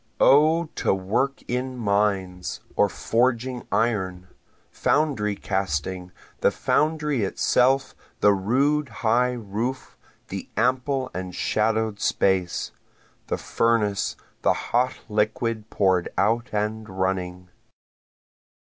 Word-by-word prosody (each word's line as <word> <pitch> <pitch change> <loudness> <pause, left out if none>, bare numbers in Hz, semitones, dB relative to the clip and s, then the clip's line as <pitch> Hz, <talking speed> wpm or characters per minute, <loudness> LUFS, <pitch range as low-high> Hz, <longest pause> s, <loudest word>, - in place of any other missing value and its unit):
O 155 +4 +5
to - - +1
work 120 +9 -1
in 125 +1 -2
mines, 100 -4 0 0.2
or - - +3
forging 125 +1 0
iron, 95 -5 0 0.4
Foundry 125 -10 +1
casting, 90 -1 -2 0.3
the - - +4
foundry 150 -5 0
itself, 130 +6 +2 0.3
the 105 - +5
rude 135 +9 +1 0.2
high 125 +3 +3
roof, 115 +3 -4 0.3
the - - -6
ample 130 +2 +1
and 90 -1 -5
shadow'd 110 -1 0
space, 95 -3 +1 0.6
The - - -1
furnace, 105 -4 0 0.3
the - - +3 0.2
hot 125 +2 +2
liquid 110 +1 -1
pour'd 95 -3 +2
out 115 +3 +1
and 105 +1 -2
running. 90 -1 -2
110 Hz, 100 wpm, -24 LUFS, 95-125 Hz, 0.6 s, O